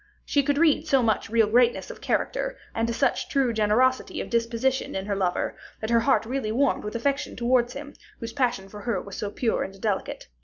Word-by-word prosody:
She 285 - +2
could 285 +1 0
read 315 -1 +3
so 270 -4 +3
much 225 0 0
real 225 0 +4
greatness 240 +3 +2
of - - -12
character, - - -1 0.2
and 225 +1 0
such 275 - 0
true 270 -4 +1
generosity 225 +4 +2
of - - -5
disposition 235 +3 0
in 190 0 -3
her 205 -1 -1
lover, 185 -2 -1 0.2
that 220 +1 -3
her 235 - +5
heart 230 -2 +2
really 245 -2 -2
warmed 265 +4 +1
with 210 +2 -5
affection 280 +5 -1
towards 245 0 +2
him, 285 +1 -8 0.3
whose 230 0 -6
passion 240 -7 0
for 205 +1 -10
her 215 -3 -1
was 200 +1 -9
so 205 - -3
pure 225 +2 -1
and 195 0 -5
delicate. 200 -2 -2
235 Hz, 205 wpm, -25 LUFS, 215-265 Hz, 0.3 s, her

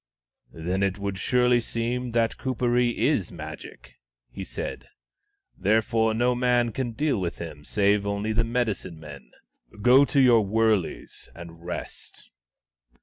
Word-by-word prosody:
" - - -65
Then 90 +4 -3
it 100 -1 0
would 100 -1 -4
surely 125 +1 +3
seem 120 +2 -3
that 115 -1 +1
Kuperee 125 -1 0
is - - +1
Magic," - - -10 0.3
he - - -6
said. - - -6 0.4
" - - -50 0.3
Therefore 110 +2 +1
no 120 +2 +2
man 120 -1 +2
can 120 -1 -3
deal 140 -4 0
with 85 -1 -3
him, 80 -3 -8
save 100 +3 +2
only 100 +2 -1
the 115 +1 +2
medicine 115 -8 -2
men. 70 -5 -11 0.5
Go 130 +4 +7
to 140 - +1
your 120 -4 +6
wurleys 110 -2 -1
and 85 -1 -11
rest." 90 - -8
110 Hz, 145 wpm, -25 LUFS, 95-125 Hz, 0.5 s, Go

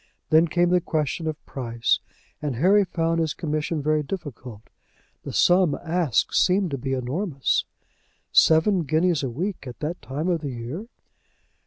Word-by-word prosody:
Then 160 +2 +6
came 175 +2 +2
the 180 0 +3
question 160 -1 -2
of 155 -1 -5
price, 115 -3 -1 0.4
and 145 -4 -2
Harry 195 - +4
found 165 -2 -1
his 160 -2 -1
commission 155 -1 -2
very 155 +1 +2
difficult. 135 - -7 0.6
The - - -5
sum 175 -4 +4
asked 165 - 0
seemed 185 -1 +3
to 140 - -2
be 135 +1 -3
enormous. 135 +4 -1 0.7
"Seven 170 +4 +4
guineas 160 +2 +1
a 135 - -2
week 170 - -4
at 125 - -9
that 160 +4 -3
time 145 +6 -4
of 170 -3 0
the 145 - -4
year!" 125 - -6
155 Hz, 155 wpm, -24 LUFS, 140-175 Hz, 0.7 s, Then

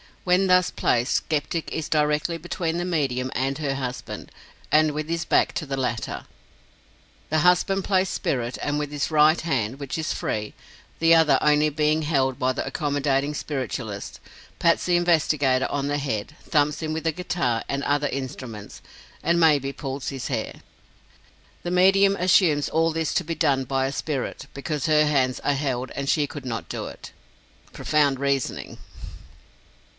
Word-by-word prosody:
When 180 +1 +3
thus 180 0 +4
placed, 120 +2 +1
skeptic 155 +2 -1
is 160 -2 -3
directly 150 +2 +1
between 165 0 -3
the 175 - -2
medium 135 -7 -1
and 135 +2 -1
her 145 -3 -2
husband, 130 -2 -6 0.4
and 155 0 +4
with 155 +1 -4
his 165 -1 -1
back - - +2
to 160 - -3
the 135 -1 -3
latter. 120 -3 -3 1.0
The 155 - +2
husband 180 +3 +3
plays 190 -1 +2
spirit, 120 -1 -2
and 145 0 0
with 150 -1 -3
his 145 -2 -2
right 155 +1 +5
hand 135 -6 -1
which 140 +1 -4
is 160 - -1
free, 105 -1 -3 0.4
the 165 0 +5
other 160 -2 +5
only 150 0 +4
being 155 +1 +1
held 135 -3 0
by 130 -1 +2
the - - -3
accommodating 140 0 0
spiritualist 130 -8 -4 0.4
pats 170 -1 +3
the 180 - +2
investigator 155 -6 +2
on 140 -1 -1
the 145 0 0
head, 135 0 -3
thumps 150 0 +1
him 155 -1 -2
with 160 +1 -4
a 165 - +3
guitar 145 -9 -1
and 140 0 -2
other 145 0 +1
instruments, 130 -6 -6 0.4
and 170 +1 +2
may 155 -3 +5
be 135 +1 -5
pulls 135 -1 -5
his 135 -3 -5
hair. 115 -5 -4 1.0
The 175 - -4
medium 195 +2 +5
assumes 175 -5 +3
all 165 0 +2
this 160 -1 -1
to 180 - +2
be 165 0 -4
done 135 -3 +1
by 135 +1 0
a - - -3
spirit, 140 -2 -4
because 145 +1 -3
her 155 -1 +4
hands 130 -4 +1
are 145 - +1
held 130 -3 -2
and 140 0 -3
she 150 - +3
could 140 -1 -8
not 115 -3 -4
do - - -4
it! - - -10 0.6
Profound 145 -3 +1
reasoning! 140 -2 -2
145 Hz, 170 wpm, -24 LUFS, 135-160 Hz, 1.0 s, right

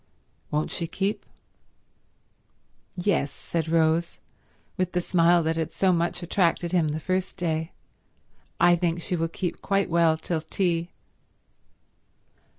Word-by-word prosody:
"Won't 150 +1 -1
she 170 - -2
keep?" 195 +5 -2 1.7
"Yes," 180 -6 +1
said 165 -1 -4
Rose, 165 +1 +2 0.6
with 185 -2 -1
the 180 - +2
smile 175 -1 +3
that 160 +1 0
had 165 0 -2
so 190 -2 +3
much 175 +1 -1
attracted 170 -1 +1
him 170 -4 +2
the 150 +1 -2
first 185 +3 -2
day. 160 -1 -2 0.9
"I 175 0 +6
think 170 0 0
she 180 - -1
will 165 -1 0
keep 175 +1 -4
quite 195 -2 0
well 165 -1 +4
till 160 0 -2
tea." 170 +1 -1
170 Hz, 130 wpm, -26 LUFS, 165-180 Hz, 1.7 s, I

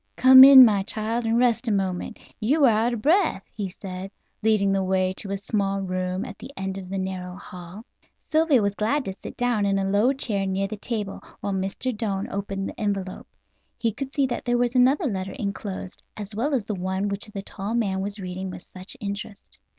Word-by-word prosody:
"Come 260 +1 +9
in, 265 -1 +11
my 205 -4 +3
child, 225 +3 -2
and 225 +1 +2
rest 245 0 +2
a - - +2
moment; 190 -3 -2 0.2
you 280 +7 +3
are - - +7
out 225 +2 +2
of 215 - -8
breath," 320 - +2
he 205 -3 -4
said, 185 0 -7 0.3
leading 210 -3 +2
the 195 -1 +1
way 185 0 +1
to 200 - -3
a 200 - -2
small 195 -1 -1
room 185 0 -2
at - - -9
the 250 - -9
end 190 0 -3
of 185 -1 -10
the 195 - -3
narrow 185 -1 -4
hall. 185 +3 -10 0.5
Sylvia 310 -7 +4
was 200 0 0
glad 235 +7 0
to 195 - -3
sit - - -9
down 245 -4 +1
in 195 -1 +1
a 195 - 0
low 205 +6 +3
chair 210 -8 -1
near 190 +1 0
the 215 - -5
table, 210 -2 -4 0.2
while 200 - -2
Mr. 195 +6 -2
Doane 200 -3 -2
opened 195 -1 -3
the - - -9
envelope. 195 -3 -3 0.5
She 230 - +1
could 270 +5 -6
see 275 -1 +1
that 255 - -3
there 245 -1 +2
was 245 0 +1
another 265 +6 +3
letter 195 -6 -3
enclosed, 200 -5 -5 0.2
as 210 0 -7
well 270 +7 0
as 235 -6 -1
the 215 - -3
one 190 +1 -2
which 200 +2 -2
the 200 -2 -7
tall 200 +3 -5
man 195 -5 0
was 200 +1 -4
reading 185 0 -5
with 180 -1 -10
such 185 +1 -4
interest. 200 0 -6
200 Hz, 215 wpm, -24 LUFS, 190-235 Hz, 0.5 s, in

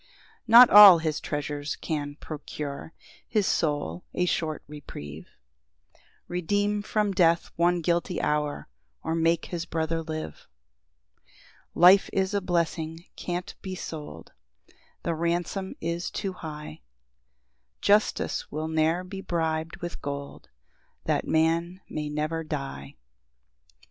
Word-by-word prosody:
] - - -29
3 - - -6
Not 240 +1 +10
all 205 -3 +11
his 160 -2 -2
treasures 145 0 -3
can 145 -2 -4
procure 150 -1 -7 0.4
His 210 -3 +1
soul 145 - -1
a 180 - +1
short 160 -3 -1
reprieve, 80 - -9 1.0
Redeem 205 +4 0
from 210 -1 0
death 170 -3 +2
one 175 +1 +2
guilty 175 +2 0
hour, 150 -1 -1 0.4
Or - - -1
make 165 0 +1
his 170 -1 -3
brother 165 0 -1
live. 155 - -6 1.3
4 - - -4
[Life 190 +2 +8
is 190 +1 0
a 200 - +1
blessing 170 -2 -2
can't 175 0 -4
be 185 -1 -5
sold, 155 -4 -8 0.7
The 170 - 0
ransom 175 +3 -2
is 170 +1 -3
too 195 -3 -4
high; 150 - -8 1.0
Justice 210 +1 +1
will 155 +1 -3
ne'er 160 +3 +1
be 190 +1 -7
brib'd 160 -2 -2
with 175 - -5
gold 140 0 -6 0.5
That - - 0
man 165 +3 +1
may 150 -1 -4
never 155 +2 -2
die. 70 - -6
165 Hz, 125 wpm, -27 LUFS, 150-180 Hz, 1.3 s, all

